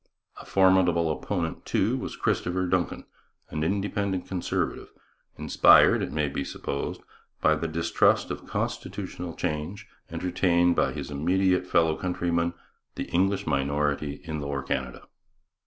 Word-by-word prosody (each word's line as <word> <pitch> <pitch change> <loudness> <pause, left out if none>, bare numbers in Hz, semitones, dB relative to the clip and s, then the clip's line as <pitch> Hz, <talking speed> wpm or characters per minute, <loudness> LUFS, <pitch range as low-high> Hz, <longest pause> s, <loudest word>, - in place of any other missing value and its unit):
A - - -14
formidable 90 -4 +4
opponent, 85 0 -3
too, - - +1
was - - -5
Christopher 90 +1 0
Dunkin, 90 -1 -1 0.5
an 75 0 -2
independent 100 +1 -1
Conservative, 90 -2 -2 0.5
inspired, - - +6
it - - -3
may 75 -1 0
be 70 0 -3
supposed, 70 +1 -4 0.4
by 80 - +4
the 80 +2 -2
distrust 85 +1 +2
of - - -6
constitutional 85 -2 -4
change 90 +6 -4 0.2
entertained 85 0 +2
by - - +2
his 70 -1 -6
immediate 90 +5 +1
fellow 80 -3 +3
countrymen, 85 -1 -1 0.4
the - - -5
English 95 +3 +1
minority 70 0 -1
in 80 -2 -4
Lower 70 -1 -3
Canada. 65 -2 -3
85 Hz, 125 wpm, -27 LUFS, 75-90 Hz, 0.5 s, inspired